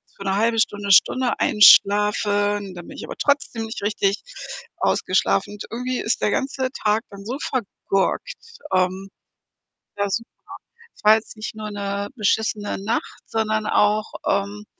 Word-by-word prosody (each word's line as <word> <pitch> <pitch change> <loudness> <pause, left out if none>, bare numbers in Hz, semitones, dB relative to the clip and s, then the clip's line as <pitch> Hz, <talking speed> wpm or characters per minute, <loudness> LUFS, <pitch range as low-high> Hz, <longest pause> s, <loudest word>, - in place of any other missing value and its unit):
für 195 - -9
'ne 195 0 0
1/2 225 +2 +1
Stunde, 205 -2 0
Stunde 255 +6 +4
einschlafe 205 0 +5
und 195 -2 -7
dann 175 -1 -10
bin - - -11
ich - - -6
aber - - -8
trotzdem 280 -5 0
nicht 225 - -7
richtig 205 -1 0 0.5
ausgeschlafen - - +1
und 210 - -8
irgendwie 250 +2 -3
ist 220 - -1
der 205 - +2
ganze 265 -1 -1
Tag 215 -1 0
dann 200 0 -10
so 250 +5 -3
vergurkt. 200 -7 -2 0.4
Ähm 185 +1 0 0.9
ja, 200 0 0
super. 230 +4 -3 0.7
Es - - -21
war 215 +1 +8
jetzt 220 - -9
nicht 215 0 -6
nur 215 -1 -6
'ne 200 0 -3
beschissene 210 -1 0
Nacht, 220 +4 -3
sondern 215 -1 -1
auch, 210 +1 +2 0.2
ähm, 200 +1 -1
210 Hz, 155 wpm, -22 LUFS, 200-225 Hz, 0.9 s, war